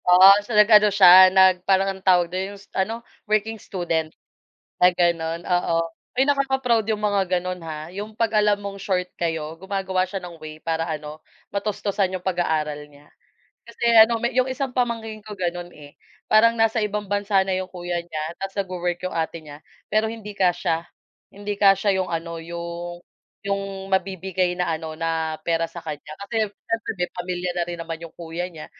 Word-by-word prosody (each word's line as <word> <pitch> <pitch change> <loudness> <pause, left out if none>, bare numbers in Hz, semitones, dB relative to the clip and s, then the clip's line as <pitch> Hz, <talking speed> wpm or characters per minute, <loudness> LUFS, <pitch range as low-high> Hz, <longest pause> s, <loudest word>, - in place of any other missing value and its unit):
Oo, 185 +2 +9
so 210 +1 -3
nag-ano 210 0 +7
siya 185 -2 +9
nag 190 -1 +5
parang 195 +1 +2
anong 190 0 -15
tawag 180 -2 +5
don 190 +2 -3
'yong - - -16
ano, 225 +5 -2 0.2
working 215 0 0
student 165 -4 -2 0.7
na 180 0 +5
ganon 170 -2 0
oo. 175 -1 +1 0.4
Uy, 265 - +5
nakaka-proud 265 -5 +2
'yong 215 0 -1
mga 205 -2 +1 0.2
ganon, 180 0 -5
ha, 155 -1 -6
'yong 205 +4 -7
kapag 220 -1 +1
alam 205 -1 +2
mong 200 -1 -6
short 185 -2 -1
kayo 160 -2 -3
gumagawa 190 0 -1
siya 190 +1 -5
ng 175 -2 -9
way 155 -1 -10
para 165 0 -1
ano, 155 -1 -6 0.2
matustusan 200 -1 -1
'yong 185 -1 -6
pag-aaral 160 -5 0 0.2
niya. 145 +1 -19 0.6
Kasi 235 0 -7
ano 225 +1 +7
may 240 +1 -2
'yong 255 0 +2
isang 260 -1 -4
pamangkin 225 -3 -2
ko 215 - -9
ganon, 175 -2 -4
eh, 145 -1 -15 0.3
parang 225 +2 +6
nasa 225 0 +2
ibang 210 -1 -3
bansa 205 0 +2
na 190 -1 0
'yong 185 0 -4
kuya 175 -1 -4
niya 160 -3 -5
tapos 195 0 -5
nagwo-work 180 -2 -3
'yong 185 -2 -4
ate 165 0 -2
niya, 150 -1 -13 0.2
pero 220 +1 +1
hindi 210 -2 -9
kasya 175 -3 +1 0.5
hindi 205 +1 -5
kasya 195 0 +4
'yong 185 -1 -2
ano 165 0 -3
'yong 170 +1 -6 0.4
'yong 195 -1 -4
mabibigay 190 -1 0
na 180 -2 0
ano 160 0 -5
na 160 -1 -2
pera 165 0 0
sa - - -18
kanya 150 -1 -7
kasi 220 +1 -1
siyempre 225 +3 -4 0.2
pamilya 180 0 -3
na 175 - +1
rin 175 0 -5
naman 165 0 -6
'yong 170 -1 -9
kuya 170 +1 -5
niya. 155 -2 -9
185 Hz, 175 wpm, -23 LUFS, 170-205 Hz, 0.7 s, Oo